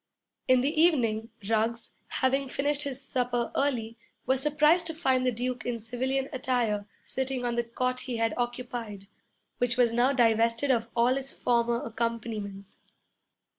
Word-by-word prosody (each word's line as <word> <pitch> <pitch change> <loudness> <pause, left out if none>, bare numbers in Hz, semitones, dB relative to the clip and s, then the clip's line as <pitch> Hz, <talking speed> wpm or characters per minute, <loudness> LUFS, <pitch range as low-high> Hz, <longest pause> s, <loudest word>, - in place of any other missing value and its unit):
In 255 -1 +5
the 300 +4 +1
evening 230 -10 +2 0.2
Ruggs, 225 +1 0 0.2
having 270 +1 0
finished 285 +2 0
his 275 -3 -3
supper 245 -3 -1
early, 235 -5 -1 0.3
was 260 +1 +2
surprised 300 +4 +3
to 325 - -5
find 265 -6 +2
the - - +3
Duke 245 0 -3
in 240 -1 -2
civilian 260 +4 -2
attire 235 -6 0 0.2
sitting 265 -1 -2
on 240 -1 -1
the 235 - +1
cot 255 +2 -2
he 250 -2 -4
had 225 -1 +1
occupied, 240 -4 -4 0.5
which 245 0 +1
was 240 -2 +4
now 245 +3 +3
divested 230 +1 +3
of 230 -2 0
all 245 +2 +3
its 270 0 -2
former 235 -1 +1
accompaniments. 220 -4 -4
245 Hz, 150 wpm, -28 LUFS, 230-265 Hz, 0.5 s, In